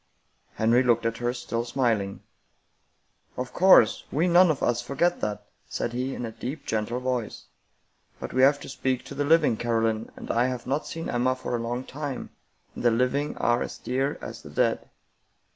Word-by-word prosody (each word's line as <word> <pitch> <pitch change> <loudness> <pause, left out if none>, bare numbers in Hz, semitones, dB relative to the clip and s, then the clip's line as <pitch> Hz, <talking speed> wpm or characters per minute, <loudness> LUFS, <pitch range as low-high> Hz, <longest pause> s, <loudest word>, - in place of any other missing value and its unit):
Henry 115 +3 +3
looked 120 -2 +2
at 115 0 0
her, 120 0 -1
still 120 -1 -3
smiling. 115 -6 -1 0.6
" - - -41
Of 125 0 -4
course, 190 +1 +6
we 160 +5 +1
none 175 +1 +6
of 155 - 0
us 120 0 +1
forget 145 +8 0
that," 105 0 -3 0.2
said 120 - -3
he, 130 +2 -2
in 125 - -4
a 115 - -5
deep, 135 +6 -6
gentle 110 +3 -1
voice, 125 -3 -3 0.4
" - - -40
but - - -6
we 130 - +2
have 140 +2 +5
to - - -8
speak 130 -1 -2
to - - -8
the 145 +1 -1
living, 150 -6 +4
Caroline, 115 -1 0
and - - -5
I 120 +2 +2
have 125 -2 -4
not 140 +4 -1
seen 165 0 -5
Emma 125 +1 +1
for 130 -1 -3
a - - -1
long 120 +2 -3
time, 140 0 -6 0.4
and - - -7
the 120 - +5
living 125 +5 0
are 120 0 +2
as - - -4
dear 135 +3 -1
as - - -7
the - - -11
dead." - - 0
125 Hz, 195 wpm, -26 LUFS, 115-140 Hz, 0.6 s, course